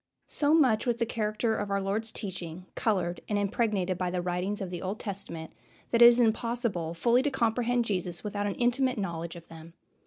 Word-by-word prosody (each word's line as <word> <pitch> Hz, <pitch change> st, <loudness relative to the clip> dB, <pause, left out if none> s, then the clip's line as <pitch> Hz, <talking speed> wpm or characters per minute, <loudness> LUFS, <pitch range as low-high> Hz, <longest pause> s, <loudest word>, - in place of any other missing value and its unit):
So 295 Hz, +1 st, +2 dB
much 255 Hz, -8 st, +3 dB
was 240 Hz, -, +2 dB
the 235 Hz, -, 0 dB
character 220 Hz, 0 st, -1 dB
of 205 Hz, -1 st, -3 dB
our 200 Hz, 0 st, +1 dB
Lord's 210 Hz, +3 st, -1 dB
teaching 180 Hz, -3 st, -5 dB
colored 180 Hz, -6 st, 0 dB
and 205 Hz, -, +1 dB
impregnated 200 Hz, -3 st, 0 dB
by 180 Hz, -1 st, 0 dB
the 180 Hz, 0 st, -2 dB
writings 180 Hz, +3 st, -2 dB
of 190 Hz, -2 st, -5 dB
the 175 Hz, -, -5 dB
Old 195 Hz, +3 st, -4 dB
Testament 170 Hz, -5 st, -6 dB, 0.4 s
that 235 Hz, -, +3 dB
it -, -, +11 dB
is 240 Hz, 0 st, +6 dB
impossible 225 Hz, -7 st, 0 dB
fully 235 Hz, +8 st, +3 dB
to 290 Hz, -, +1 dB
comprehend 245 Hz, -1 st, +1 dB
Jesus 180 Hz, -4 st, -2 dB
without 205 Hz, -1 st, -2 dB
an 200 Hz, -, -2 dB
intimate 250 Hz, +1 st, +1 dB
knowledge 170 Hz, -4 st, -4 dB
of 170 Hz, -1 st, -12 dB
them. 165 Hz, +1 st, -12 dB
205 Hz, 195 wpm, -29 LUFS, 180-235 Hz, 0.4 s, it